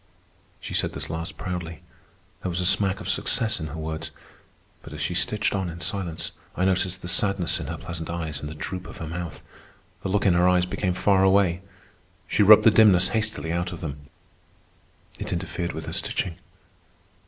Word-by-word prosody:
She - - -7
said - - 0
this - - -3
last 80 +1 -5
proudly. 85 -3 -5 0.6
There 90 - -2
was 90 +1 -2
a 90 - 0
smack 95 +1 +3
of - - -7
success 115 -3 +1
in 80 - -4
her 75 +2 -7
words. 80 0 -4 0.7
But - - -11
as 75 - -7
she 75 +4 -1
stitched 105 +4 +1
on 95 -3 -1
in 85 +1 -8
silence, 90 -4 -2 0.3
I 90 - +2
noticed 95 0 0
the - - -5
sadness 95 -1 +2
in 75 - -5
her 85 +2 -4
pleasant 80 0 -6
eyes 80 -4 -3
and 75 - -6
the 80 - -8
droop 90 +4 -5
of - - -10
her 80 - -5
mouth. 85 +1 -6 0.6
The 95 - -3
look 105 +2 +1
in 95 - +5
her 90 +1 +4
eyes 90 -1 +3
became 90 0 -1
far 95 0 +3
away. 95 -2 +3 0.7
She - - +1
rubbed 105 +1 +9
the 110 - +7
dimness 105 -5 +6
hastily 110 -7 -1
out 85 +1 -1
of - - -7
them; 70 -3 -7 1.1
it - - -5
interfered 85 0 -3
with 80 0 -6
her - - -5
stitching. 85 -3 -2
90 Hz, 195 wpm, -25 LUFS, 80-95 Hz, 1.1 s, rubbed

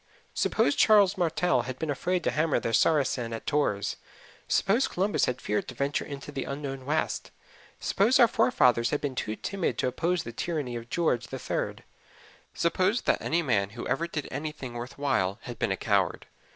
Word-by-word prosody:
Suppose 145 - +2
Charles 205 -3 +5
Martell 175 - +1
had 130 - -5
been 160 0 -2
afraid 180 +5 -1
to - - +1
hammer 155 0 +1
the 115 - -3
Saracen 130 -5 +2
at 115 - -6
Tours; 125 -10 0 0.5
suppose 230 +7 +2
Columbus 195 +3 +1
had 125 0 -2
feared 105 - -2
to 130 - -8
venture 140 +3 -1
out - - -12
into 140 0 -7
the 135 -2 -3
unknown 140 -2 -5
West; 155 +2 -1 0.5
suppose 220 +7 +3
our 240 - +8
forefathers 130 - +3
had 150 - 0
been 140 -2 -3
too 110 -3 -3
timid 195 - -2
to - - 0
oppose 170 +7 0
the 115 - -7
tyranny 145 -3 -3
of 115 0 -7
George 125 -6 0
the 135 - -5
Third; - - -3 0.7
suppose 185 +7 +1
that - - +1
any 170 +1 0
man 100 -9 +1
who - - -4
ever 165 +5 0
did 150 -3 -4
anything 140 -3 -5
worth 120 +3 -7
while 100 -9 0
had 120 -2 -8
been 105 - 0
a 95 - 0
coward! 100 -3 0
140 Hz, 190 wpm, -28 LUFS, 120-170 Hz, 0.7 s, our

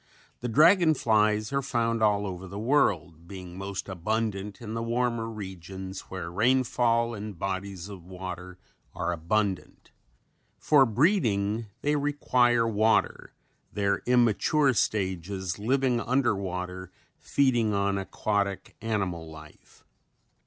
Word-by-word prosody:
The 125 - -4
dragon 160 - +5
flies 110 -1 +2
are 140 - +1
found 115 -3 -1
all 105 -1 +3
over 95 -1 -6
the 100 - -8
world 95 - +1
being 90 -2 -9
most 95 0 -5
abundant 100 +1 -2
in 110 -2 -7
the 115 - -2
warmer 115 -1 -1
regions 95 -2 -7
where 90 -3 -5
rainfall 115 +1 +2
and 105 -3 -7
bodies 95 0 -4
of 100 -4 -10
water 90 0 -8 0.4
are 85 - -1
abundant. 95 +3 -2 0.7
For 140 -4 +4
breeding 115 - +1 0.2
they 150 +1 +2
require 125 -5 +2
water, 110 0 +1 0.4
their 100 -1 0
immature 125 +4 +3
stages 95 -3 -1
living 125 +2 +1
under 125 -3 +1
water 90 -1 -5 0.3
feeding 120 -6 +1
on 100 0 +1
aquatic 100 0 -2
animal 95 -7 -2
life. 75 -1 -15
105 Hz, 115 wpm, -27 LUFS, 95-120 Hz, 0.7 s, dragon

